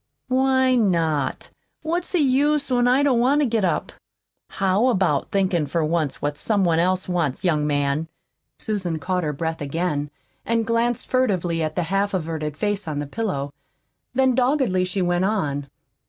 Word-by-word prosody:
"Why 260 0 +3
not? 165 - 0 0.3
What's 340 +4 -2
the - - +3
use 285 +1 +2
when 245 -1 +3
I 260 +3 +4
don't 265 -5 +3
want 265 +5 +3
to - - +3
get 225 -4 0
up?" 180 - 0 0.6
"How 195 +5 +1
about 185 - +1
thinkin' 185 -6 +1
for 160 +2 0
once 155 -3 -1
what 145 0 -2
somebody 185 -6 +2
else 185 +1 0
wants, 170 -7 -1
young 155 -5 +1
man?" 145 +2 0 0.5
Susan 190 -7 -2
caught 180 +3 -2
her 150 - -1
breath 160 +2 -4
again, 145 0 -2 0.3
and 230 -1 0
glanced 230 +1 0
furtively 185 -10 0
at 155 -1 -2
the 175 - 0
half 195 +3 0
averted 155 -4 -3
face 205 -2 -2
on 150 -2 -3
the 145 - -2
pillow. 145 -6 -3 0.6
Then 260 0 +3
doggedly 250 -7 +2
she 185 +1 -1
went 175 +1 +1
on. 145 -9 -1
185 Hz, 165 wpm, -23 LUFS, 155-235 Hz, 0.6 s, I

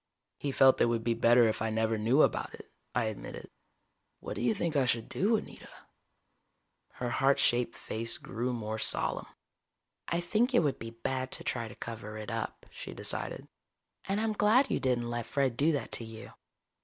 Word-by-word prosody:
"He 140 - -2
felt 135 0 +5
it - - +7
would 115 -1 0
be 115 - +2
better 120 +1 +5
if 110 - -1
I 110 - 0
never 110 0 +1
knew 115 +8 +4
about - - 0
it," - - -14 0.2
I 120 - +2
admitted. 110 -1 -6 0.7
"What - - -6
do - - -4
you 220 - +2
think 170 -5 -1
I 135 -3 +3
should 115 -2 0
do, 215 +5 +2
Anita?" - - -9 1.2
Her 125 -1 -3
heart 135 +2 +3
shaped 120 -1 +2
face 115 +1 -2
grew 120 +3 -3
more 110 -2 -3
solemn. - - 0 0.8
"I 170 - 0
think 220 +9 +1
it 170 - +5
would 145 -3 0
be 115 - -6
bad 130 +3 -3
to - - -5
try 115 -2 -2
to - - -11
cover 110 -2 -7
it 110 +2 -6
up," 115 -1 -4
she - - -8
decided. - - -2 0.6
"And 195 +2 0
I'm 220 0 0
glad 220 +6 +4
you - - +1
didn't 125 -2 0
let 120 -1 -3
Fred 135 -3 +1
do 150 +6 +3
that 145 - -3
to - - -1
you. 110 0 -9
120 Hz, 190 wpm, -31 LUFS, 115-145 Hz, 1.2 s, it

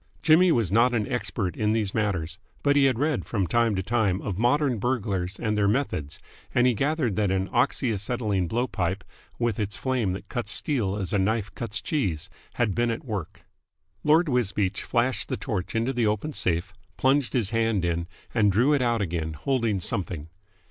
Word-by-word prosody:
Jimmy 175 +3 +6
was 115 - +1
not 120 +3 +4
an 110 0 0
expert 110 - -2
in 105 0 +1
these 105 -3 0
matters, 90 -6 -1 0.2
but 145 0 +3
he 140 -1 +5
had 130 -4 +2
read 145 +1 0
from 100 -5 -1
time 115 +4 +2
to 95 - -1
time 105 -4 +1
of 100 - -3
modern 125 0 +2
burglars 100 -6 -1
and 105 -2 -1
their 105 -1 +2
methods, 100 - -1 0.4
and 125 - +4
he 125 - +4
gathered 140 - 0
that 105 -2 +2
an 95 0 0
oxy 120 0 +1
acetylene 105 -3 -1
blow 120 +7 0
pipe, 95 -4 -2 0.3
with 120 -3 -1
its 105 -1 -2
flame 125 -8 0
that 95 +1 -7
cuts 120 +3 -3
steel 115 - -1
as 95 -4 -3
a 100 - +3
knife 105 +1 0
cuts 110 -3 -2
cheese, 95 - -2 0.2
had 115 -5 +1
been 120 +2 +1
at 115 +6 -3
work. 105 -9 -5 0.6
Lord 160 +3 +4
Wisbeach 105 -7 0
flashed 120 -2 0
the - - -1
torch 105 -6 -4
into 115 +4 0
the 120 -3 +1
open 105 +9 -1
safe, 90 -2 0 0.2
plunged 135 0 +2
his 115 -7 0
hand 115 -5 +1
in, 85 0 -1 0.3
and 105 -4 +3
drew 125 +9 +3
it 145 - +2
out 120 -3 +1
again, 80 -3 -3
holding 115 - 0
something. 85 -5 -2
110 Hz, 190 wpm, -26 LUFS, 95-125 Hz, 0.6 s, Jimmy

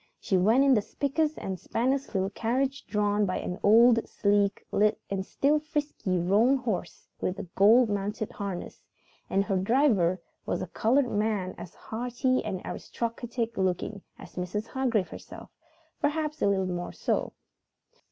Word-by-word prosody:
She 195 - -1
went 220 +9 +4
in 275 -1 +5
the 215 - +4
spickest 295 +7 -1
and 190 -2 -4
spannest 260 0 -1
little 190 +1 0
carriage 260 +6 -1
drawn 210 0 +1
by 185 -2 0
an 180 - -4
old, 230 +2 +5
sleek 200 -1 +1
and 200 -2 +1
still 290 +9 +1
frisky 295 - -2
roan 210 +10 +3
horse 220 -9 -4
with 185 - -2
a - - -4
gold 225 +5 +6
mounted 205 +1 -2
harness 200 -4 -6 0.5
and 195 - +2
her 195 -2 0
driver 195 - +3 0.2
was - - -2
a 175 - -9
colored 255 +4 +3
man 205 -3 0
as 175 - -10
haughty 245 +3 -1
and 195 -4 -4
aristocratic 230 0 -4
looking 190 +2 -1 0.2
as - - -13
Mrs. 180 +4 -3
Hargrave 240 -5 0
herself; - - -11 0.5
perhaps 305 0 -1
a - - +3
little 195 -1 +2
more 175 -1 -4
so. - - -1
215 Hz, 150 wpm, -28 LUFS, 195-255 Hz, 0.5 s, gold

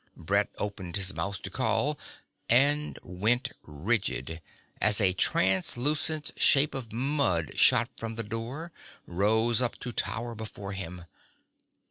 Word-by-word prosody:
Brett 100 +5 0
opened 95 -4 -5
his 100 -1 +1
mouth 100 0 -4
to - - -6
call 130 +4 0 0.5
and 145 +5 +3
went 105 +8 0
rigid, 80 0 -2 0.4
as 105 +1 +6
a 95 -3 +5
translucent 145 - +1
shape 145 +1 +5
of 125 -5 -6
mud 120 - 0
shot - - +5
from 115 0 -5
the 115 - -4
door, 115 +10 -6 0.3
rose 110 +6 +2
up 125 -1 -1
to 125 - -5
tower 115 +2 -2
before 105 -3 -8
him. 90 -2 -7
110 Hz, 125 wpm, -28 LUFS, 95-125 Hz, 0.5 s, as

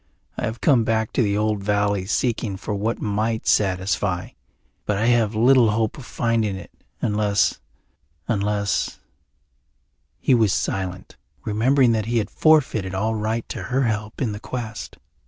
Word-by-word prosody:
I - - -2
have 110 +2 -5
come 130 -6 +4
back 110 -1 0
to - - +2
the 100 -3 +1
old 105 -1 0
valley 100 -2 0
seeking 110 -3 -1
for 100 +2 -4
what 105 +3 -1
might 110 +2 -1
satisfy, 95 -1 +1 0.6
but 105 - +1
I 110 - 0
have 115 -3 +2
little 120 +1 +5
hope 110 0 0
of 125 - -11
finding 115 -4 0
it, 95 - -10 0.3
unless 105 -1 +1 0.7
unless 100 -2 -1 0.6
" - - -47
He 135 - +2
was 110 -5 +3
silent, 95 -1 -3 0.3
remembering 120 +4 +3
that 110 -1 0
he 120 0 0
had 110 - -1
forfeited 135 - +2
all 110 +4 0
right 110 +1 -2
to - - -5
her 135 +1 0
help 110 +1 -2
in 115 - -1
the 105 - -6
quest. 115 -2 -6
110 Hz, 155 wpm, -23 LUFS, 100-115 Hz, 0.7 s, little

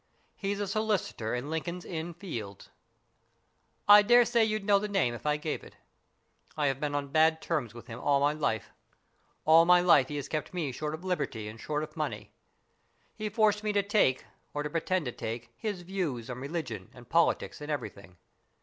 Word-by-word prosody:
He's 200 0 -3
a 205 - 0
solicitor 200 - -1
in 130 +5 -4
Lincoln's 170 +2 -3
Inn 165 0 -5
Fields. 115 - -7 1.2
I 205 0 +10
dare 240 +3 +6
say 235 -1 +3
you'd 215 -2 -1
know 200 -1 +5
the 210 - -3
name 195 -12 +1
if 120 - -6
I 150 0 +2
gave 150 +1 -4
it. - - -14 0.8
I 150 - +1
have 135 -1 0
been 145 -1 -2
on 140 -1 -2
bad 160 +2 +4
terms 140 -11 -2
with 120 -1 -10
him 115 -2 -8
all 140 -1 +2
my 145 +1 +3
life. 110 -9 -2 0.7
All 160 +1 +7
my 180 +1 +6
life 170 -7 +5
he 150 - -5
has 145 - -4
kept 155 +3 -4
me 155 -6 -1
short 150 +4 -3
of 160 - -12
liberty 130 - -2
and 110 +1 -9
short 150 0 -2
of - - -9
money. - - -4 0.8
He 215 -1 -4
forced 210 0 +2
me 210 - +1
to 200 -1 +2
take, 200 -11 +2 0.3
or 145 - -1
to 150 - -4
pretend 170 +1 0
to 125 - -2
take, 115 +1 -6
his 205 - -4
views 160 -11 -3
in 125 - -6
religion 135 - -5
and 120 -2 -13
politics 165 0 +1
and 150 - -7
everything. 100 -10 -5
155 Hz, 195 wpm, -30 LUFS, 130-190 Hz, 1.2 s, I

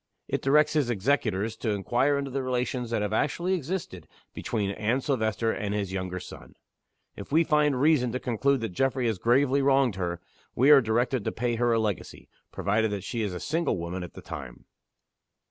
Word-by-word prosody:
It - - -2
directs 150 +3 +3
his 145 -5 +1
executors 110 -2 0
to 115 - -3
inquire 120 +8 +1
into 140 -1 -3
the 135 +1 -2
relations 125 -1 -2
that 115 -3 0
have 105 0 -2
actually 170 +10 0
existed 160 - -4 0.3
between 105 -4 -2
Anne 110 +6 0
Silvester 115 -4 0
and 105 -1 -3
his 100 -3 -3
younger 95 -1 -3
son. - - -12 0.6
If 100 - -10
we 160 +3 +4
find 150 -4 +2
reason 140 -4 +3
to 130 - -1
conclude 130 +2 0
that 115 - -2
Geoffrey 130 +6 0
has 110 -5 0
gravely 135 +5 +3
wronged 135 -6 +3
her, 85 -2 -2 0.4
we 135 +5 +5
are 140 -2 +9
directed 120 +1 0
to - - 0
pay 120 0 -1
her 120 0 +2
a 115 - +3
legacy 105 -5 -3 0.2
provided 110 +3 0
that 100 -2 -4
she 115 +3 -3
is 105 -3 -1
a - - -4
single 160 - -1
woman 85 +2 -4
at 90 - -9
the - - -10
time." 60 -3 -8
120 Hz, 195 wpm, -27 LUFS, 105-140 Hz, 0.6 s, are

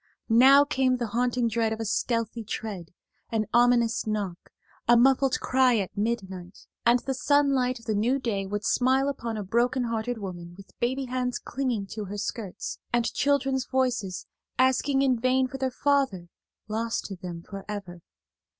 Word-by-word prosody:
Now 265 +5 +7
came 260 -3 +1
the 240 -3 -3
haunting 245 0 +1
dread 225 0 0
of 220 - -3
a 225 - -3
stealthy 230 +1 -1
tread, 200 -5 -5 0.4
an 220 -1 0
ominous 240 -2 +3
knock, 205 -5 -3 0.4
a 240 0 +6
muffled 265 +2 +3
cry 255 -2 +3
at 195 -3 -3
midnight, 190 -4 -4 0.2
and 240 +1 +6
the 270 - -2
sunlight 270 -2 +2
of 230 - -15
the 220 - -1
new 230 +6 +1
day 205 -7 -2
would 205 +1 -3
smile 260 +2 +2
upon 235 -5 -3
a 210 - -3
broken 245 +6 +1
hearted 230 +1 -2
woman 175 -4 -7
with 195 - -14
baby 260 +3 -1
hands 250 -1 -2
clinging 245 -6 -2
to 215 -1 -5
her 200 +2 -6
skirts, 205 -2 -5
and 240 -1 +1
children's 270 -2 +1
voices 245 -8 -1 0.3
asking 265 +2 +2
in 255 -3 +2
vain 255 +2 +2
for 270 +1 -8
their 265 0 0
father 260 -10 0 0.4
lost 225 +2 -2
to 195 - -6
them 175 -2 -8
forever. 195 -3 -7
235 Hz, 165 wpm, -27 LUFS, 210-260 Hz, 0.4 s, Now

